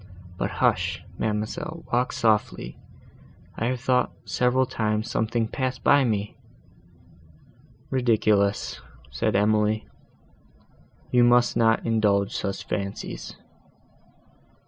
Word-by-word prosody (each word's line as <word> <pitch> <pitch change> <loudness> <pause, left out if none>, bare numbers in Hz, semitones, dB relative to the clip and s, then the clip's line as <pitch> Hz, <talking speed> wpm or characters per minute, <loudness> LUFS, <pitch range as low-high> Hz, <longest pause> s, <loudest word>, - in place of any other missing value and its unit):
But - - -2
hush! - - 0 0.2
ma'amselle, 110 +10 -3
walk 125 +1 +2
softly! 110 -2 0 0.8
I 115 - -2
have 125 0 -1
thought, 125 0 +2
several 125 +1 +2
times, 110 -3 -1
something 115 +1 0
passed 130 +2 -3
by 145 -1 +5
me." 105 -3 -2 1.6
"Ridiculous!" 110 -5 +1 0.3
said - - -1
Emily, 105 +1 +2 1.2
"you 125 -1 +5
must 120 0 +4
not 115 -1 +3
indulge 105 -3 +1
such 100 - -3
fancies." 100 -1 -5
110 Hz, 95 wpm, -25 LUFS, 105-125 Hz, 1.6 s, by